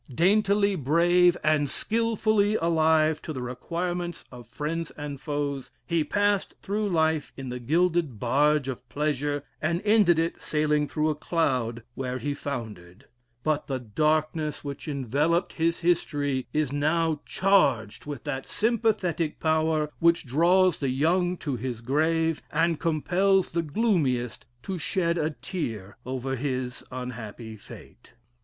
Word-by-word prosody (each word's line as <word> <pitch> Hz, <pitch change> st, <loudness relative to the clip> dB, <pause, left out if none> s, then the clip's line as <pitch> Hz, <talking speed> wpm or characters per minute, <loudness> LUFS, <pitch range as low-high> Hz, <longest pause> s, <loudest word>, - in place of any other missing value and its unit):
Daintily 200 Hz, -, +3 dB
brave 175 Hz, +3 st, +4 dB
and 155 Hz, -2 st, +2 dB
skilfully 215 Hz, -, +1 dB
alive 160 Hz, -3 st, +3 dB
to -, -, -6 dB
the 130 Hz, -, -5 dB
requirements 175 Hz, +8 st, -4 dB
of 120 Hz, -3 st, -11 dB
friends 155 Hz, +6 st, -3 dB
and 145 Hz, -2 st, -6 dB
foes, 145 Hz, -2 st, -3 dB, 0.2 s
he 170 Hz, -2 st, +1 dB
passed 205 Hz, +4 st, 0 dB
through 205 Hz, +1 st, -1 dB
life 160 Hz, -4 st, +1 dB
in 135 Hz, -1 st, -6 dB
the 125 Hz, 0 st, -4 dB
gilded 160 Hz, -, +1 dB
barge 145 Hz, +4 st, +2 dB
of 125 Hz, -2 st, -6 dB
pleasure, 145 Hz, +1 st, -1 dB, 0.2 s
and 170 Hz, +2 st, 0 dB
ended 205 Hz, -6 st, +5 dB
it 165 Hz, +1 st, -1 dB
sailing 150 Hz, -1 st, +1 dB
through 155 Hz, +1 st, 0 dB
a -, -, +1 dB
cloud 130 Hz, -8 st, -1 dB
where 130 Hz, -1 st, -3 dB
he 145 Hz, +2 st, -2 dB
foundered. 110 Hz, -7 st, -7 dB, 0.4 s
But 155 Hz, -1 st, 0 dB
the 135 Hz, -, -1 dB
darkness 155 Hz, +5 st, 0 dB
which 140 Hz, +2 st, -6 dB
enveloped 150 Hz, -, 0 dB
his 165 Hz, +1 st, 0 dB
history 145 Hz, -6 st, 0 dB
is 150 Hz, -3 st, 0 dB
now 155 Hz, +2 st, +1 dB
charged 145 Hz, -, +2 dB
with 145 Hz, -3 st, -6 dB
that 135 Hz, -3 st, -4 dB
sympathetic 210 Hz, -8 st, 0 dB
power 155 Hz, -1 st, +1 dB
which 170 Hz, 0 st, +3 dB
draws 175 Hz, +6 st, +3 dB
the 140 Hz, -, 0 dB
young 175 Hz, +7 st, +1 dB
to 140 Hz, -4 st, -1 dB
his 120 Hz, 0 st, -4 dB
grave, 160 Hz, +6 st, +1 dB
and 165 Hz, 0 st, +1 dB
compels 180 Hz, +5 st, +2 dB
the 170 Hz, -, 0 dB
gloomiest 150 Hz, -, 0 dB, 0.2 s
to 190 Hz, -2 st, -4 dB
shed 170 Hz, +1 st, 0 dB
a 155 Hz, 0 st, +1 dB
tear 120 Hz, -, -5 dB
over 130 Hz, +1 st, -2 dB
his 130 Hz, -2 st, -3 dB
unhappy 115 Hz, -3 st, -7 dB
fate. 105 Hz, -, -14 dB
155 Hz, 135 wpm, -26 LUFS, 135-170 Hz, 0.4 s, ended